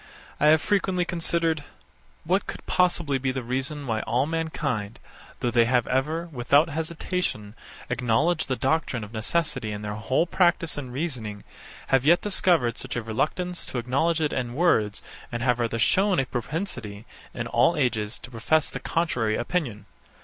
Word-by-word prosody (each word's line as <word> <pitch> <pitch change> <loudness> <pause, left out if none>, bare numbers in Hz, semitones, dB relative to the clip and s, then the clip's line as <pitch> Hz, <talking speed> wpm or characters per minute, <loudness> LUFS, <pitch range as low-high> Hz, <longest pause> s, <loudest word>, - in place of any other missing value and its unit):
71. 150 - +4
I - - +8
have 160 - +3
frequently 190 -3 +1
considered, 165 -2 0 0.6
what 185 +5 +1
could - - -7
possibly 170 -6 +2
be 130 0 0
the 130 -1 -4
reason 135 +4 -2
why 115 -3 -1
all 125 +4 +1
mankind, 145 -9 -2 0.4
though 120 - +1
they 120 -1 +4
have 125 0 +2
ever, 155 +6 0
without 140 +4 +3
hesitation, 160 - -3 0.3
acknowledged 125 +8 +1
the 130 - 0
doctrine 135 -4 0
of 105 +2 -10
necessity 115 0 -1
in 105 0 -5
their 105 0 -3
whole 120 +9 +1
practice 175 -1 +2
and 130 -4 -6
reasoning, 125 -8 -4 0.5
have 135 -1 +4
yet 170 +5 +5
discovered 170 - +2
such - - -5
a 120 - -2
reluctance 155 +11 -2
to - - -4
acknowledge 140 +8 +1
it 150 - 0
in 120 -2 -2
words, 110 - +2 0.3
and 120 0 -3
have 125 -1 +2
rather 115 -1 0
shown 190 - +3
a 135 - +1
propensity, 120 - -4 0.3
in 120 - -3
all 120 +8 +3
ages, 110 -5 0
to 130 - -12
profess 145 +7 +1
the - - -4
contrary 160 -11 0
opinion. 120 - -2
135 Hz, 165 wpm, -26 LUFS, 115-165 Hz, 0.6 s, I